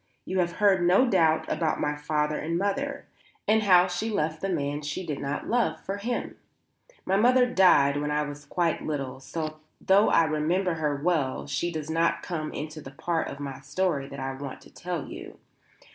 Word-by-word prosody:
You 185 0 -1
have 175 -1 +1
heard 200 -3 +3
no 180 +9 +4
doubt 165 -7 +3
about 155 0 0
my 150 0 0
father 150 0 -1
and 165 +2 -2
mother, 240 +9 -2 0.4
and 220 +1 +4
how 180 -4 +6
she 185 +5 -2
left 160 -7 -1
the 195 - -1
man 145 -4 -1
she 150 +5 -4
did 150 -4 -4
not 140 +1 -3
love 240 +1 +1
for 195 +1 -4
him. 235 +4 -3 0.7
My 190 +1 +2
mother 250 +4 +5
died 180 - +4
when 150 - -2
I 150 0 +1
was 145 0 -7
quite 170 +3 0
little; 135 -4 -4
so, 155 +2 -5 0.2
though 195 +3 +4
I 165 - +5
remember 165 +4 0
her 150 -3 -1
well 145 -3 0
she 175 - -2
does 155 -1 -4
not 165 +1 +1
come 155 -3 -4
into 155 +1 -6
the 135 - -9
part 165 +4 -2
of 140 - -7
my 140 -2 -6
story 150 -1 -1
that 140 - -8
I 135 0 -3
want 135 0 -7
to - - -17
tell 175 -4 -4
you. - - -9
160 Hz, 195 wpm, -27 LUFS, 150-185 Hz, 0.7 s, how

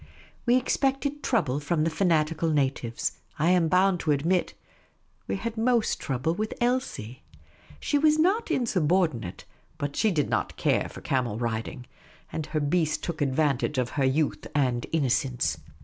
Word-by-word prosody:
We 240 - +5
expected 275 +3 0
trouble 150 - +1
from 155 +2 0
the 165 - +1
fanatical 165 -2 +1
natives; 135 -6 -1 0.2
I 165 +4 +3
am 180 -3 +3
bound 185 +1 +3
to 155 - -3
admit, 165 +6 +1 0.7
we - - -1
had 225 +3 -4
most 235 -1 +2
trouble 135 +4 -1
with 215 +4 -3
Elsie. 240 - -1 0.6
She 290 - +1
was 305 +1 +4
not 390 +8 +2
insubordinate, 170 - 0 0.3
but 145 0 -3
she 220 - +2
did 150 -8 +1
not - - -2
care - - +1
for - - -10
camel 125 -5 -1
riding. 115 +2 -3 0.5
And 155 -2 -3
her 155 0 -1
beast 155 +2 0
took 165 -2 -4
advantage 140 0 +1
of 125 -2 0
her 140 - -1
youth 145 +3 0
and 125 -4 +1
innocence. 125 - 0
155 Hz, 150 wpm, -27 LUFS, 135-195 Hz, 0.7 s, We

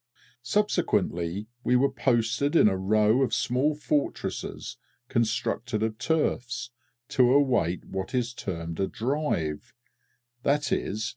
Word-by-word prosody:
Subsequently, 105 - 0 0.2
we 125 - +2
were 135 +2 +3
posted 125 +3 +1
in 160 - +7
a 95 - +2
row 105 +5 +3
of 130 - +1
small 135 +5 +1
fortresses 145 - -3 0.3
constructed 115 0 0
of 110 -1 -2
turfs, 120 -6 -1 0.4
to 125 -2 +4
await 125 - +2
what 95 +6 -4
is 120 -1 0
termed 85 -7 -5
a 95 - +1
"Drive," 115 - -2 0.7
_i.e. 140 -7 0
120 Hz, 115 wpm, -27 LUFS, 100-135 Hz, 0.7 s, in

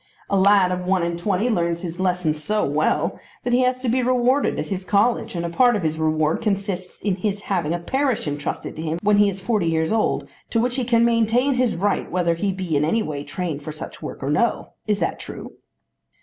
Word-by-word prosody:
"A - - +3
lad 195 -1 +5
of 180 0 -2
one 185 -2 +2
and 170 0 -1
twenty 200 +4 0
learns 170 -6 0
his 175 0 -5
lessons 180 -5 0
so 210 +4 +1
well 150 +2 0 0.2
that 245 - -1
he 245 - +4
has 255 0 +1
to - - -1
be 250 +2 +2
rewarded 255 +2 +2
at - - -4
his 190 -2 -3
college, 205 +2 +1
and 170 0 -2
a - - -2
part 240 +7 +4
of 205 - -2
his 160 0 -1
reward 155 0 +1
consists 195 -4 -3
in 195 -3 0
his 200 +1 -2
having 175 -7 -1
a 170 - 0
parish 260 - -1
entrusted 145 0 -4
to - - -4
him 160 0 -2
when 210 0 +4
he 205 0 +5
is 195 0 -6
forty 205 -4 0
years 160 +3 +1
old, 225 - 0 0.2
to 230 - +1
which 245 +2 0
he 255 - 0
can 235 -1 +3
maintain 235 +4 +2
his 250 -2 +1
right 195 +3 0
whether 175 -2 +1
he 195 +4 -1
be 185 -4 -3
in 145 - +2
any 215 +9 +1
way 145 -2 -4
trained 165 -3 -4
for 155 - -6
such 155 - -8
work - - -7
or 140 - -1
no. 235 +10 +1 0.2
Is 210 -1 +2
that - - -2
true?" - - -8
190 Hz, 235 wpm, -22 LUFS, 170-230 Hz, 0.2 s, lad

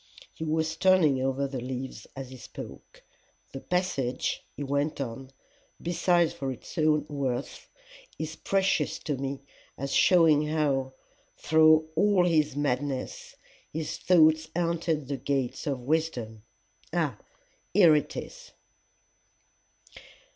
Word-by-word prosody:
He - - -7
was 160 0 -1
turning 165 -8 +4
over 135 +1 0
the 135 -1 -5
leaves 130 +1 -6
as 135 -1 -7
he 130 - -9
spoke. 120 - -11 0.5
"The 135 - -5
passage," 140 -8 -1
he 145 - -3
went 145 +2 -1
on, 130 0 -5 0.5
"besides 175 0 +2
for 135 -1 -4
its 125 - -10
own 155 -1 +3
worth, 135 -4 -4 0.5
is 160 0 -5
precious 190 -6 0
to 150 - -3
me 135 0 -4 0.4
as 140 0 -4
showing 160 -4 +5
how, 140 -4 0 0.4
through 155 0 +5
all 200 0 +4
his 155 -5 +2
madness, 140 -1 -2 0.4
his 155 0 -4
thoughts 160 -2 +4
haunted 165 -4 -1
the 140 -1 -3
gates 135 +1 -2
of 135 -3 -2
wisdom. 125 -7 -2 0.5
Ah! - - -1 0.5
here 170 -6 +6
it 150 - -1
is! - - -9
150 Hz, 120 wpm, -28 LUFS, 135-160 Hz, 0.5 s, here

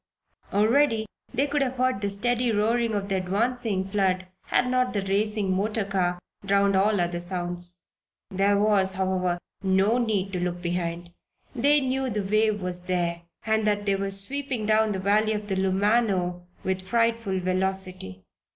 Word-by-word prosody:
Already 225 +2 +3 0.3
they 260 +3 +1
could 290 0 -1
have 260 -1 0
heard 255 -5 0
the 200 - -1
steady 240 +4 0
roaring 225 +1 +1
of 200 -1 -2
the 195 -1 0
advancing 200 +1 -1
flood 190 -2 0 0.2
had 250 - +1
not 255 0 +1
the 200 -2 -1
racing 200 0 0
motor 210 +2 -1
car 180 -3 0 0.3
drowned 200 0 +2
all 200 +1 +3
other 175 0 -1
sounds. 175 0 -2 0.5
There 200 +1 +2
was, 200 -2 +3
however, 185 -2 0 0.2
no 195 +4 +2
need 200 -5 -1
to 180 - -1
look 175 0 -2
behind; 175 0 -3 0.4
they 290 +4 +3
knew 265 0 -1
the 210 -2 -2
wave 215 0 +1
was 180 0 -2
there 170 -2 -1 0.2
and 220 -1 +1
that 205 0 0
it 195 -1 +1
was 195 0 +1
sweeping 270 -3 -3
down 215 0 +3
the 195 - -2
valley 210 +3 +2
of 210 -1 -4
the 195 - -1
Lumano 190 -2 +1 0.2
with 190 0 -1
frightful 230 -1 0
velocity. 185 - -2
200 Hz, 160 wpm, -26 LUFS, 185-220 Hz, 0.5 s, Already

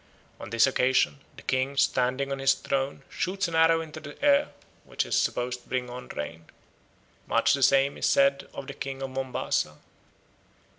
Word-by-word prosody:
On - - -8
this 115 +1 +4
occasion 125 - +2 0.2
the - - -13
king, 130 +2 -1
standing 130 +1 +1
on 135 - -2
his 135 0 +4
throne, 135 0 -2
shoots 190 0 -2
an 170 - -7
arrow 165 0 +4
into 160 -2 -8
the 145 -1 -11
air, 285 0 +4 0.3
which - - -2
is - - -1
supposed 125 0 0
to - - -25
bring 125 -1 -2
on 125 +1 -8
rain. 80 +3 -6 0.8
Much - - +3
the 140 - 0
same 135 +1 +3
is - - +1
said 140 0 +3
of 140 - -7
the 140 - -7
king 135 -1 -5
of 135 - -4
Mombasa. 130 -12 -2
135 Hz, 180 wpm, -27 LUFS, 125-140 Hz, 0.8 s, this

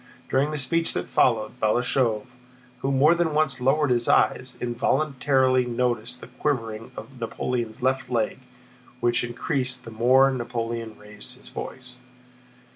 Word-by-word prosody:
During 135 +3 +2
the 155 - -3
speech 165 +4 +1
that - - -3
followed, 115 0 +1
Balashëv, 115 0 +1 0.5
who 135 - -1
more 140 +4 +5
than 170 -3 0
once 140 -5 +1
lowered 140 +2 +2
his 120 -1 +1
eyes, 130 0 +2
involuntarily 130 +1 +1
noticed 120 0 -2
the - - -9
quivering 115 -6 -2
of 130 -3 -10
Napoleon's 120 +1 -3
left 130 -1 0
leg 115 -3 -1 0.6
which 120 0 +1
increased 125 +1 -2
the 115 - -8
more 130 +4 +4
Napoleon 115 -2 -4
raised 105 +4 -11
his 130 - -13
voice. 125 -1 -8
125 Hz, 135 wpm, -25 LUFS, 115-135 Hz, 0.6 s, more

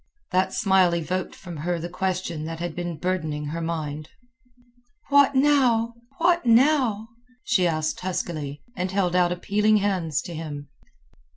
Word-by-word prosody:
That 185 +1 +2
smile 190 -5 +3
evoked 180 +2 -3
from 175 -4 -9
her 175 +4 -1
the 165 +1 -4
question 180 -3 -3
that 165 0 -5
had 175 -1 -4
been 175 -2 -4
burdening 155 -4 -2
her 160 +3 -4
mind. 155 -2 -4 1.0
"What 280 -1 +5
now? 255 -5 +3 0.2
What 345 +1 +3
now?" 235 -3 +3 0.3
she 180 -2 +2
asked 155 -2 -1
huskily, 155 -6 -4
and 185 0 -2
held 185 -2 0
out 175 -1 +3
appealing 210 +4 +2
hands 185 -8 0
to 175 - -7
him. 145 -3 -6
180 Hz, 145 wpm, -24 LUFS, 165-210 Hz, 1.0 s, What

